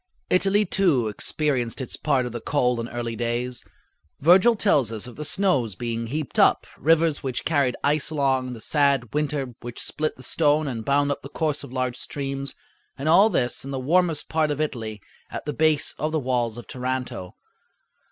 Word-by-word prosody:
Italy, 195 +3 +3
too, 165 - +2
experienced 125 +2 -1
its 130 - -3
part 135 -4 +1
of 125 - -4
the 120 0 -6
cold 125 -4 +1
in 115 - -3
early 120 -1 -4
days. 120 +2 -1 0.6
Virgil 185 - +6
tells 145 - +2
us 110 0 -4
of 125 - -9
the 150 - -5
snows 145 - +1
being, 115 +2 -3
heaped 150 +2 -3
up, - - +4
rivers 160 +1 +3
which 130 -3 -4
carried 140 -6 +2
ice 145 0 +2
along, 135 -4 0
the 115 - -9
sad 140 -6 +2
winter 145 -4 -1
which 120 0 -7
split 155 0 -2
the 130 - -11
stone 150 +2 +2
and 115 -5 -4
bound 145 +1 +2
up 140 - -3
the 140 - -9
course 150 -1 -1
of - - -10
large 130 -1 -2
streams, 135 0 -4 0.4
and 140 - -4
all 190 +7 +6
this 125 - 0
in 135 - -7
the 135 -1 -3
warmest 165 +3 +1
part 155 -1 +1
of 145 0 -2
Italy, 115 -8 -3 0.3
at - - -6
the 150 - -2
base 155 -2 +2
of 155 +1 -1
the 160 - +1
walls 120 -4 -1
of 120 - -8
Taranto. 125 -7 -4
140 Hz, 190 wpm, -24 LUFS, 120-155 Hz, 0.6 s, Virgil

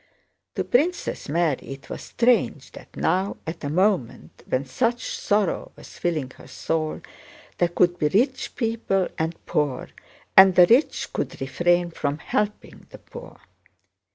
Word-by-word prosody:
To - - -1
Princess 325 - 0
Mary 160 -3 +1
it 135 - -13
was - - -7
strange 240 0 +1
that - - -14
now, 190 +2 0
at 160 0 -6
a 145 - -2
moment 185 - -1
when 130 +2 0
such 235 - -1
sorrow 205 -3 0
was - - -14
filling 155 -7 -2
her - - -14
soul, 155 +4 -3 0.6
there 175 - +4
could 175 +1 +1
be 150 - +2
rich 250 - 0
people 225 -5 0
and 160 +1 -1
poor, 145 -4 -1 0.5
and 190 -1 +8
the 180 - +8
rich 245 - +2
could - - -4
refrain 175 +6 +1
from 145 -2 -2
helping 210 +6 -3
the - - -11
poor. 485 - -12
175 Hz, 145 wpm, -24 LUFS, 155-215 Hz, 0.6 s, and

